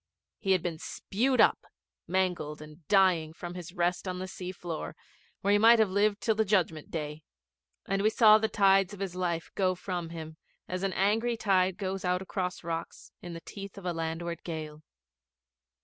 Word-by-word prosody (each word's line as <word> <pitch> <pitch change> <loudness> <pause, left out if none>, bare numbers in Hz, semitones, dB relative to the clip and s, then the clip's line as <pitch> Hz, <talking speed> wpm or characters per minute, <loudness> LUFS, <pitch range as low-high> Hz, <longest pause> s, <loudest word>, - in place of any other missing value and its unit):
He 195 -2 +2
had 185 -3 +1
been 165 -3 -3
spewed 250 +11 -1
up, - - +5 0.5
mangled 175 -4 -1
and 150 +1 -13
dying, 185 -6 +3
from 175 +1 -7
his 180 -2 -8
rest 180 +1 -1
on 180 0 -3
the 185 +1 -4
sea 185 -1 -6
floor, 170 -3 -6 0.5
where 200 - +2
he 205 - +5
might 230 +2 +7
have 220 -4 +3
lived 205 +1 +2
till 225 - +2
the 220 +1 +2
Judgment 180 -7 0
Day, 150 -1 -4 0.6
and 195 0 0
we 215 - +4
saw 215 -1 +7
the 220 0 0
tides 195 0 +3
of - - -15
his 195 -3 -3
life 170 -2 -2
go 185 -2 +1
from 175 -2 -4
him 160 -1 -8 0.3
as 185 0 -3
an 195 -1 -1
angry 225 +5 +1
tide 190 -3 +2
goes 195 -1 -3
out 180 0 +1
across 185 -1 -3
rocks 165 0 -5
in 175 -1 -7
the 165 - -7
teeth 200 +1 -9
of 195 - -9
a 175 - 0
landward 165 +1 -4
gale. 155 -2 -6
185 Hz, 190 wpm, -29 LUFS, 170-195 Hz, 0.6 s, might